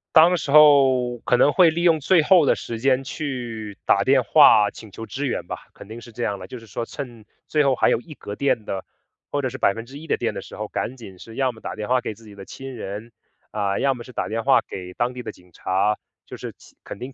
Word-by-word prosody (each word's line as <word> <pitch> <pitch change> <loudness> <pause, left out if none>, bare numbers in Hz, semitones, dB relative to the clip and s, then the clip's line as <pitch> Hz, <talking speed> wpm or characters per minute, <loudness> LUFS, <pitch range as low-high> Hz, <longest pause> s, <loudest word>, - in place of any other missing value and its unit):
当 170 +3 +7
时 150 -5 -3
候 135 -5 +5
可 125 - +1
能 145 - +4
会 180 -3 +6
利 170 +2 -2
用 165 -3 +4
最 175 +4 +4
后 170 0 +5
的 - - +4
时 115 -1 -6
间 130 0 +3
去 120 -7 -5
打 - - +3
电 - - +4
话 105 -1 +6
请 110 - -13
求 115 +3 -8
支 140 +5 -4
援 130 - -3
吧， - - -7
肯 - - -13
定 115 +2 -9
是 120 - -13
这 120 +2 -5
样 100 -3 -1
啦， 90 - -10
就 125 - -8
是 115 - -16
说 110 - -4
趁 120 -4 -8 0.2
最 150 -1 +2
后 135 -2 +2
还 - - +3
有 - - +1
一 155 - -12
格 100 - -8
电 125 -5 0
的 95 -2 -4 0.5
或 145 - 0
者 130 - -1
是 130 - -7
1% 130 +7 -2
的 - - +1
电 - - -2
的 - - -6
时 - - -11
候， - - -4
赶 130 - -4
紧 100 -6 -12
是 115 +5 -12
要 130 -2 0
么 110 - -16
打 - - -6
电 105 -1 -5
话 125 0 +2
给 110 - -4
自 115 +2 -18
己 105 -2 -13
的 100 - -10
亲 135 +6 -9
人， 110 +1 -7 0.4
啊， 100 -2 -1
要 135 - +2
么 120 -2 -9
是 125 - -13
打 - - -3
电 115 +1 -3
话 135 +1 +5
给 90 -1 -8
当 120 +4 -1
地 125 0 -7
的 - - -5
警 90 0 -22
察， 100 +5 0 0.3
就 - - -9
是 - - -7
起 - - -19
肯 - - -9
定 130 +2 -7
120 Hz, 280 characters per minute, -23 LUFS, 110-140 Hz, 0.5 s, 当